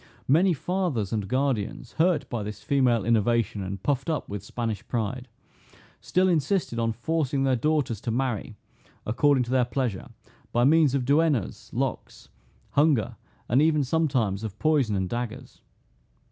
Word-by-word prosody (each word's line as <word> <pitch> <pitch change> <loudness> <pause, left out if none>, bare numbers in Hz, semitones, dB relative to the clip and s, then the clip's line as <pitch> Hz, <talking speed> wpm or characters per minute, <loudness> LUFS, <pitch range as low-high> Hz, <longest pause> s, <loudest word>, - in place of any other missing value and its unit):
Many 170 +8 +4
fathers 160 - -2
and 105 -3 -2
guardians, 130 -3 -1
hurt 160 -5 +2
by 120 - -3
this 105 0 -7
female 125 -7 +2
innovation, 115 -2 +1
and 95 0 -5
puffed 140 +2 0
up 155 - -2
with 100 -2 -6
Spanish 115 -4 -4
pride, 120 +2 -3 0.7
still 185 +1 +1
insisted 165 -6 0
on 115 0 +1
forcing 140 +3 -1
their 135 -1 +2
daughters 135 -5 0
to - - -4
marry 120 -3 -2 0.5
according 135 +4 +3
to 120 - -6
their 130 -1 +3
pleasure, 120 -5 -2 0.4
by 120 - +2
means 150 0 +4
of 130 -3 0
duennas, 145 - +1
locks, - - -4 0.4
hunger, 145 -7 +2 0.3
and 125 +5 +3
even 155 -2 +3
sometimes 130 -9 0
of 110 -2 -6
poison 145 -8 +2
and 95 -1 -1
daggers. 120 +2 -6
125 Hz, 145 wpm, -26 LUFS, 110-150 Hz, 0.7 s, Many